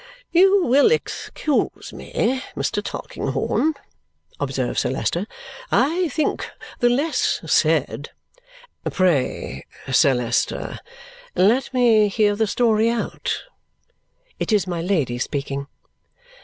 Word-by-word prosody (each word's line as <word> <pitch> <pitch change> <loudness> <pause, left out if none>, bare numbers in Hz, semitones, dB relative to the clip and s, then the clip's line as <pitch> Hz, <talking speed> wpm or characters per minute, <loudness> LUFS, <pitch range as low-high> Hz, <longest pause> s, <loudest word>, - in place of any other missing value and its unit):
"You 385 +2 +5
will 275 - +5
excuse 310 -9 -1
me, 260 +3 -1
Mr. - - -1
Tulkinghorn," 315 0 -1 0.6
observes - - -1
Sir - - -1
Leicester. - - -1 0.4
"I 340 +6 +2
think 300 +2 -1 0.3
the 240 - +4
less 285 +6 +1
said - - +1 0.4
" - - -9
"Pray, 140 - 0 0.3
Sir 135 0 +5
Leicester, 120 -1 -1 0.6
let 230 +8 +3
me 235 -5 +4
hear 205 0 +2
the 220 +1 +1
story 225 0 +2
out" 235 0 -2 1.0
(it - - -2
is 205 -5 +3
my 175 -2 -3
Lady 155 -10 0
speaking). 140 +1 -3
220 Hz, 105 wpm, -22 LUFS, 170-280 Hz, 1.0 s, You